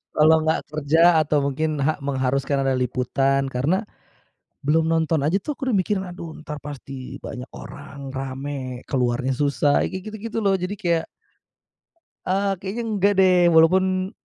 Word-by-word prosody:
kalau 155 +1 +6
gak 160 - +2
kerja 160 +3 +4
atau 150 -2 +1
mungkin 155 +3 -1
ha 155 +1 0
mengharuskan 135 0 0
ada 135 - +1
liputan, 135 +2 0
karena 150 - 0 0.8
belum 160 +2 +2
nonton 160 -1 +1
aja 155 +6 +2
tuh 300 - -4
aku 265 -1 -4
udah 235 - +2
mikir, 195 +1 0
aduh 175 -3 -7
entar 150 -1 -7
pasti 135 -2 -8
banyak 125 +1 -7
orang, 140 -1 -9
rame, 135 -1 -5
keluarnya 125 0 0
susah, 145 0 +2
kayak 190 - -4
gitu-gitu 220 +1 -5
loh, 195 -2 +2
jadi 185 +2 -3
kayak 170 -4 +1 1.2
eee 195 +2 +1
,kayaknya 200 +6 -4 0.2
nggak 200 +2 +4
deh 185 -1 +5 0.2
walaupun 185 +3 +4
155 Hz, 145 wpm, -23 LUFS, 135-185 Hz, 1.2 s, kalau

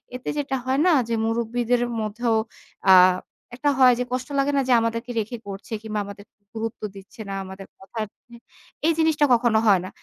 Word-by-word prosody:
এতে 250 - -5
যেটা 280 -2 -1
হয় 260 +1 +1
না - - +5 0.2
যে 230 - +1
মুরুব্বিদের 235 +1 0 0.2
মধ্যেও 225 +2 -1 0.6
আ - - +10 0.6
একটা 290 +4 0
হয় 255 -1 +7
যে - - +1
কষ্ট 255 0 -2
লাগে 275 +1 +2
না - - +4
যে - - +6
আমাদেরকে 230 +2 -2
রেখে 220 +3 -4
করছে। 200 +3 -7
কিংবা 215 -1 -3
আমাদের 200 0 -10 0.3
গুরুত্ব 225 +1 -5
দিচ্ছে 200 +4 -12
না - - -4
আমাদের 190 +1 -9
কথার। 215 +3 -5 0.8
এই 330 - +4
জিনিসটা 315 -2 +3
কখনো 235 -2 +3
হয় 195 -4 +5
না। - - -6
230 Hz, 180 wpm, -23 LUFS, 215-255 Hz, 0.8 s, আ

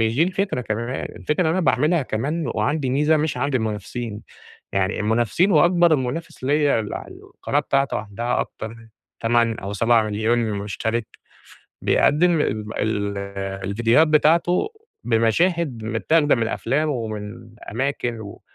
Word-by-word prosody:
دي 160 - +4
الفكرة 190 -5 -1
كمان، 115 +2 -3
الفكرة 150 +4 -1
إن - - +1
أنا 170 +4 +1
باعملها 150 +2 +2
كمان 140 +8 -2
وعندي 145 -3 0
ميزة 150 +4 +3
مش 150 -4 -1
عند 140 +1 -1
المنافسين، 110 0 -3 0.5
يعني 95 +1 0
المنافسين 120 - +2
وأكبر 175 0 +5
منافس 130 +3 -5
ليّا 145 -2 +2
اللي 105 - -4
على - - -10 0.2
القناة 145 - 0
بتاعته 135 -1 0
عندها 110 +3 -2
أكتر 110 - -6
من 115 0 -13 0.3
8 115 -1 +2
أو 100 +2 -5
7.000.000 110 +1 +2
مشترك، 105 +3 -2 0.8
بيقدم 165 +2 +3
ال 110 -2 -2
ال 100 -2 -3
الڤيديوهات 120 +8 +4
بتاعته 165 - +3 0.3
بمشاهد 120 - +1
متاخدة 145 +7 +2
من 115 -2 0
أفلام، 150 +6 0
ومن 110 -3 -5 0.2
أماكن 125 -1 -2
و 100 - -10
120 Hz, 135 wpm, -22 LUFS, 110-150 Hz, 0.8 s, وأكبر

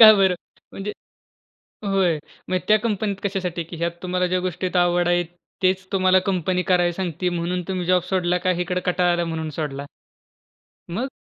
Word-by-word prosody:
का 215 -1 +12
बरं? 190 -2 +4 0.4
म्हणजे, 205 +2 -4 0.9
होय 190 -5 +2 0.3
मग 185 - +2
त्या 215 - +6
कंपनीत 210 -2 -1
कशासाठी, 185 -4 -2
की 170 +1 -9
ह्यात 170 +1 0
तुम्हाला 180 0 +1
ज्या 185 +1 +1
गोष्टीत 180 0 -3
आवड 175 0 +3
आहे, 175 0 +3 0.4
तेच 185 0 +2
तुम्हाला 185 -1 +4
कंपनी 180 0 0
करायला 175 -2 +3
सांगती 180 -1 -2
म्हणून 175 +1 -1
तुम्ही 185 -2 -2
जॉब 180 0 +4
सोडला 180 -2 +2
का 185 - +4
इकडे 180 +1 -1
कंटाळा 180 0 +3
आला 175 0 0
म्हणून 160 -1 -3
सोडला? 140 -2 -3 1.1
मग? 230 +10 -2
180 Hz, 165 wpm, -23 LUFS, 175-190 Hz, 1.1 s, का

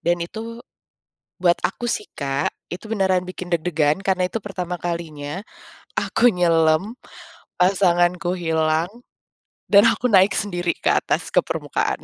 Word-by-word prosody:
Dan 170 0 0
itu, 230 +5 -8 0.8
buat 175 -1 +4
aku 240 -1 -4
sih, 210 - -2
Kak, 140 0 -2 0.2
itu 180 +5 -7
beneran 190 -4 +1
bikin 185 -1 -7
deg-degan 160 -2 +1
karena 185 -1 +1
itu 225 - -2
pertama 180 -4 -5
kalinya 170 0 -5 0.6
aku 245 +2 +3
nyelem, 170 +2 +2 0.6
pasanganku 180 -1 +2
hilang, 160 0 0 0.8
dan 205 +2 +7
aku 250 -1 +1
naik 195 0 +5
sendiri 175 -4 -1
ke - - 0
atas - - 0
ke - - +4
permukaan. - - -2
180 Hz, 130 wpm, -22 LUFS, 170-195 Hz, 0.8 s, dan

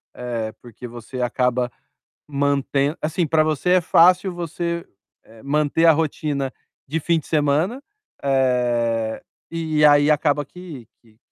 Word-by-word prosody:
eh, 115 -3 -4
porque 120 0 -10
você 120 +2 -7
acaba 125 0 0 0.6
mantem 140 +1 0
assim, 160 +3 0
pra 155 0 +3
você 155 +3 0
é 185 -1 +5
fácil 180 +3 +4
você, 170 0 -4 0.4
eh, 110 +2 -17
manter 150 +3 +1
a 165 - +8
rotina 145 -3 -1 0.3
de 160 +4 -2
fim 165 +1 +1
de - - -14
semana, 155 - +1 0.4
eh, 120 -4 0 0.3
e 160 -2 +1
aí 145 0 +5
acaba 145 -1 +1
que 155 - -11
que 110 -2 -25
145 Hz, 135 wpm, -22 LUFS, 125-160 Hz, 0.6 s, a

